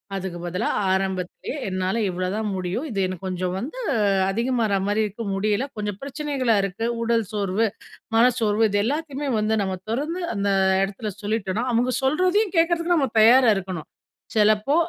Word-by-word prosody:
அதுக்கு 185 Hz, -2 st, -4 dB
பதிலா, 180 Hz, +5 st, -2 dB, 0.2 s
ஆரம்பத்திலே 190 Hz, +3 st, -2 dB
என்னால 185 Hz, +2 st, -1 dB
இவ்வளதான் 185 Hz, +4 st, -2 dB
முடியும். 185 Hz, -, -3 dB
இது 200 Hz, -4 st, -3 dB
எனக்கு 185 Hz, +1 st, -6 dB
கொஞ்சம் 180 Hz, 0 st, -2 dB
வந்து 300 Hz, -, -6 dB, 0.5 s
அதிகமாற 230 Hz, -1 st, +1 dB
மாரி 215 Hz, +1 st, +1 dB
இருக்கு. 210 Hz, +3 st, -6 dB
முடியல 210 Hz, +5 st, 0 dB
கொஞ்சம் 205 Hz, -2 st, -3 dB
பிரச்சனைகளாக 275 Hz, -6 st, 0 dB
இருக்கு. 195 Hz, +4 st, -3 dB, 0.2 s
உடல் 230 Hz, -1 st, +2 dB
சோர்வு, 205 Hz, +1 st, 0 dB, 0.5 s
மனச்சோர்வு 225 Hz, -2 st, +3 dB
இது 205 Hz, 0 st, +1 dB
எல்லாத்தையுமே 290 Hz, +2 st, -2 dB
வந்து 215 Hz, +1 st, +1 dB
நம்ம 190 Hz, -1 st, -1 dB
தொறந்து 300 Hz, +10 st, -2 dB
அந்த 200 Hz, 0 st, 0 dB, 0.3 s
இடத்தில 200 Hz, +2 st, -4 dB
சொல்லிட்டோன்னா, 215 Hz, +1 st, -1 dB
அவுங்க 245 Hz, +2 st, +2 dB
சொல்றதையும் 365 Hz, +9 st, +2 dB
கேக்கிறதுக்கு 335 Hz, +1 st, +3 dB
நம்ம 270 Hz, -6 st, +1 dB
தயாரா 240 Hz, +1 st, +7 dB
இருக்கணும். 180 Hz, -4 st, -5 dB, 0.5 s
சிலப்போ 215 Hz, +5 st, +3 dB
215 Hz, 140 wpm, -23 LUFS, 195-260 Hz, 0.5 s, தயாரா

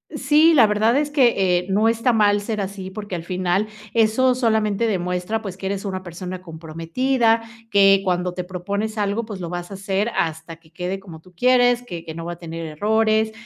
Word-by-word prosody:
Sí, 315 Hz, +2 st, +4 dB
la 235 Hz, -7 st, +6 dB
verdad 220 Hz, +5 st, +2 dB
es 295 Hz, 0 st, 0 dB
que, 200 Hz, -, +3 dB
eh, 180 Hz, -, -8 dB
no 210 Hz, +3 st, +3 dB
está 230 Hz, +2 st, +2 dB
mal 205 Hz, -2 st, +3 dB
ser 210 Hz, 0 st, -3 dB
así, 190 Hz, -1 st, -5 dB
porque 205 Hz, -2 st, -6 dB
al 165 Hz, -, -5 dB
final 185 Hz, +3 st, 0 dB, 0.3 s
eso 235 Hz, +3 st, +3 dB
solamente 220 Hz, -3 st, +1 dB
demuestra, 180 Hz, +2 st, -2 dB
pues, 195 Hz, -4 st, -6 dB
que 190 Hz, 0 st, -5 dB
eres 195 Hz, +1 st, -3 dB
una 185 Hz, -1 st, -4 dB
persona 180 Hz, +1 st, -7 dB
comprometida, 185 Hz, +9 st, 0 dB, 0.3 s
que 195 Hz, -1 st, +5 dB
cuando 180 Hz, -1 st, -1 dB
te 180 Hz, -, -4 dB
propones 200 Hz, +4 st, -4 dB
algo, 210 Hz, +2 st, -1 dB
pues, 205 Hz, -4 st, -7 dB
lo 170 Hz, -2 st, -5 dB
vas 175 Hz, +2 st, -6 dB
a -, -, -6 dB
hacer 195 Hz, +3 st, -1 dB
hasta 160 Hz, 0 st, -2 dB
que 165 Hz, -1 st, -25 dB
quede 180 Hz, +2 st, -4 dB
como 170 Hz, -5 st, -12 dB
tú 185 Hz, +1 st, -20 dB
quieres, 245 Hz, +3 st, +3 dB
que 170 Hz, -8 st, -7 dB
que 160 Hz, -1 st, -7 dB
no 165 Hz, 0 st, -7 dB
va 175 Hz, -, -4 dB
a -, -, -9 dB
tener 165 Hz, -1 st, -6 dB
errores. 220 Hz, +6 st, +1 dB
195 Hz, 205 wpm, -22 LUFS, 180-220 Hz, 0.3 s, la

